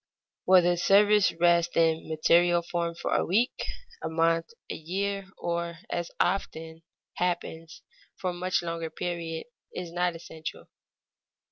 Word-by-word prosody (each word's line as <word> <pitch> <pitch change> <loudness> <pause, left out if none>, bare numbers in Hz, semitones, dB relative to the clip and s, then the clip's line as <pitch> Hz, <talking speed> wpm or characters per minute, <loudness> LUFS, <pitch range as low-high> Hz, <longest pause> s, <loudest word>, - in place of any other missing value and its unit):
Whether 180 -1 +6
the 175 - 0
service 205 +2 +5
rests 170 0 +3
in 165 -1 +2
material 170 +2 +4
form 170 -1 -2
for - - -2
a - - +3
week, 225 +8 +1 0.3
a 160 - -3
month, 165 0 +1 0.2
a - - -4
year, 195 +4 -3
or 170 0 -3
as 175 -1 -2
often 165 -3 -1 0.4
happens, 170 -2 -3 0.3
for 185 - -2
a - - -7
much 180 0 -1
longer 165 -1 -3
period, 165 -1 -4 0.3
is 175 -2 -5
not 175 -1 0
essential. 160 -1 -8
170 Hz, 135 wpm, -28 LUFS, 165-180 Hz, 0.4 s, Whether